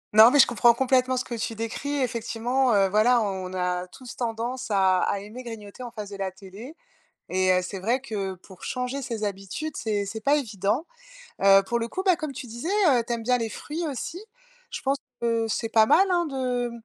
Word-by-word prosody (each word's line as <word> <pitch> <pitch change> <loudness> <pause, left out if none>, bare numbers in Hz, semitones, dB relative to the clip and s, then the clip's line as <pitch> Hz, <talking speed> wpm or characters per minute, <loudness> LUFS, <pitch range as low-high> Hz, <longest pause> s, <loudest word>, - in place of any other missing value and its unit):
Non, 220 +2 +10
mais 285 - +3
je - - +9
comprends, 235 0 +4
complètement, 255 0 +2
ce 250 - -2
que - - -7
tu 225 0 -3
décris. 230 +6 -3
Effectivement, 240 +1 0
heu, 195 -1 +4
voilà, 215 +5 +4
on 190 -2 -3
a 180 0 -1
tous 250 +6 -11
tendance 240 +2 -3
à 190 -3 +3
à 200 - 0
aimer 215 +5 -9
grignoter 225 -2 -9
en 245 - -5
face 210 -3 -8
de 200 - -7
la 195 -1 -2
télé. 195 - -11 0.5
Et 185 0 +2
heu, 180 - +3
c'est 185 +2 -6
vrai 230 +7 0
que 200 -7 -4
pour 185 0 -16
changer 255 +2 -3
ses 225 -3 -4
habitudes, 205 +10 -4
c'est 210 -2 -1
c'est 220 +2 -6
pas 280 +6 +3
évident. 220 - -1 0.6
Heu, 195 0 +7
pour 235 +3 0
le 230 - -2
coup, 375 +10 -4
bah, 370 -2 +5
comme 310 -3 -5
tu 265 -1 -7
disais, 235 +7 -6 0.2
heu, 255 -6 +4
tu 235 - -4
aimes 230 -1 -5
bien 250 +2 +3
les 230 -2 -2
fruits 315 +9 -5
aussi. 310 +6 -5 0.5
Je - - -5
pense 275 +1 +1 0.2
que 230 -1 0
c'est 225 +1 -1
pas 220 -1 +5
mal, 385 - +5
hein, 345 -1 +2
de 250 -3 -2
230 Hz, 215 wpm, -25 LUFS, 200-255 Hz, 0.6 s, Non